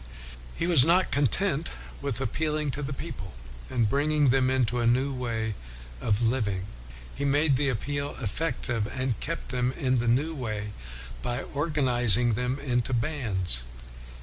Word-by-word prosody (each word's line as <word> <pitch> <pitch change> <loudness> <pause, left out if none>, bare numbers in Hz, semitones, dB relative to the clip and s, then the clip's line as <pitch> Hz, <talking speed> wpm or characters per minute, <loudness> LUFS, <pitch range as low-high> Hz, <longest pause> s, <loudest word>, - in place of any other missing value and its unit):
He - - 0
was 170 -7 +7
not 175 +5 +3
content 150 - +2 0.3
with 140 -4 -1
appealing 150 +3 -1
to 145 - -4
the 140 -1 -3
people, 135 - -6 0.4
and 120 -4 +2
bringing 145 +3 +2
them 130 0 +3
into 125 -2 +1
a 120 - +2
new 130 +4 +2
way 115 -3 -2 0.5
of 110 +1 +1
living, 105 -6 0 0.5
he 140 - -4
made 145 +1 +3
the 140 +1 +2
appeal 140 +4 -2
effective 120 -2 -2
and 130 -2 -2
kept 165 -2 -4
them 125 0 0
in 130 -2 +1
the 120 - -1
new 140 +8 +2
way 110 -7 -4 0.5
by 120 -1 -2
organizing 125 - +2
them 125 +4 -1
into 125 -2 0
bands. 110 - -1
130 Hz, 150 wpm, -27 LUFS, 115-145 Hz, 0.5 s, was